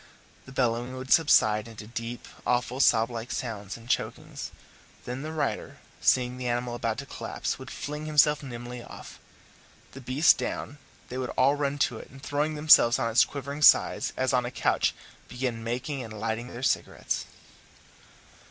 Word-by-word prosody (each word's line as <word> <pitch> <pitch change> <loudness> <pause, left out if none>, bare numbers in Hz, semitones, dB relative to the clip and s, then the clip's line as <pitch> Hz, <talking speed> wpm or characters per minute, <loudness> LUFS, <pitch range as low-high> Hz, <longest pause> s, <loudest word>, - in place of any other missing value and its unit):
The - - -10
bellowing 125 -1 0
would 130 0 -7
subside 110 -9 +4
into 110 -2 -10
deep, 115 +1 -6 0.2
awful, 125 +1 0
sob 115 -3 +4
like 115 +1 -6
sounds 105 -5 -4
and 115 0 -15
chokings; - - -3 0.6
then 125 +2 -4
the 155 +2 -5
rider, 160 -1 -3 0.2
seeing 125 +6 +2
the 125 - -3
animal 120 0 -1
about 115 -2 -2
to 140 - -5
collapse, - - -4
would - - -9
fling 150 +1 -5
himself 150 -1 +4
nimbly 120 -2 -7
off. - - -11 0.7
The 135 - -10
beast 130 +6 +4
down, 145 - -4 0.3
they 125 - -4
would 130 - -3
all 135 +2 +5
run 145 -1 -1
to 115 - -6
it, - - -12
and 135 - -13
throwing 145 +3 -1
themselves 150 -6 +6
on 115 - -1
its 110 - +6
quivering 140 +1 -6
side - - +6
as 130 +1 +1
on 125 -1 +3
a 120 - -3
couch, - - +1 0.3
begin 125 -2 -3
making 130 +4 -3
and 110 -2 -8
lighting 115 +2 -2
their 125 0 -8
cigarettes. 120 - -1
125 Hz, 170 wpm, -27 LUFS, 115-140 Hz, 0.7 s, themselves